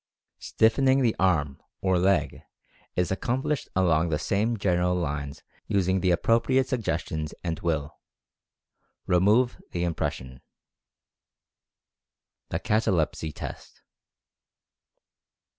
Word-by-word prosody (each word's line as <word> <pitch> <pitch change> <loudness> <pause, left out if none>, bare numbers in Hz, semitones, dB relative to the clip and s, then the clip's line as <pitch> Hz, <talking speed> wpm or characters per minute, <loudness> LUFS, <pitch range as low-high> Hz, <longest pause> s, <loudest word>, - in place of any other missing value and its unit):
Stiffening 130 +4 +3
the 115 -3 +2
arm, 75 -7 +1 0.2
or 95 -2 +1
leg, 95 +2 +1 0.5
is 90 -1 0
accomplished 125 +8 -1
along 85 -3 +2
the 75 - 0
same 110 +8 0
general 90 -2 +1
lines 75 -4 -4 0.2
using 95 -1 +1
the 90 0 +1
appropriate 115 +8 +2
sugges 110 -10 -2
tions 80 -1 -5
and 85 -2 -3
Will. 80 -4 -2 1.1
Remove 105 +8 +3
the 85 - -1
impression. 65 -6 -3 2.1
THE - - -1
"CATALEPSY" 85 -8 0
TEST. - - -9
90 Hz, 95 wpm, -26 LUFS, 80-110 Hz, 2.1 s, Stiffening